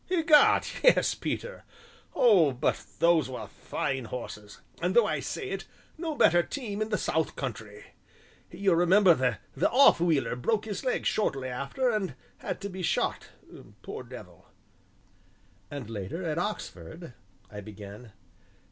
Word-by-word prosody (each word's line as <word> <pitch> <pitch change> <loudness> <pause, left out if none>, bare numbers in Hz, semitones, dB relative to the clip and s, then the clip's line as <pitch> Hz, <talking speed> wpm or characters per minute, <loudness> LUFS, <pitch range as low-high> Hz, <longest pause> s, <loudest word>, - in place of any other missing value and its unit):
"Egad, 320 -4 +5 0.2
yes, - - +5
Peter! - - -5 0.5
Oh, 180 - +5
but 125 +4 -1
those 165 -4 +3
were 130 - -6
fine 130 -2 -4
horses 105 -3 -8 0.2
and 180 +2 0
though 235 - +6
I - - -1
say 400 -3 -5
it, - - -5 0.3
no 320 -2 -4
better 175 - +5
team 215 -1 -5
in 215 - -1
the 210 - 0
south 160 0 -1
country. 110 -5 -6 0.6
You'll 195 -4 +1
remember 180 +1 +6 0.4
the - - +2
'off 270 -6 +6
wheeler' 160 -7 +1
broke 210 - -1
his 205 -3 -5
leg 255 - -1
shortly 135 -11 0
after 140 - -1
and 195 - -2 0.2
had - - -4
to 200 - -4
be 185 -1 -7
shot, 175 - -1 0.5
poor - - -6
devil." - - -12 1.2
"And 140 -5 -7
later, 110 - -5
at 160 -1 -2
Oxford," 170 - -6 0.4
I 105 0 -7
began. 105 +2 -11
170 Hz, 140 wpm, -28 LUFS, -, 1.2 s, though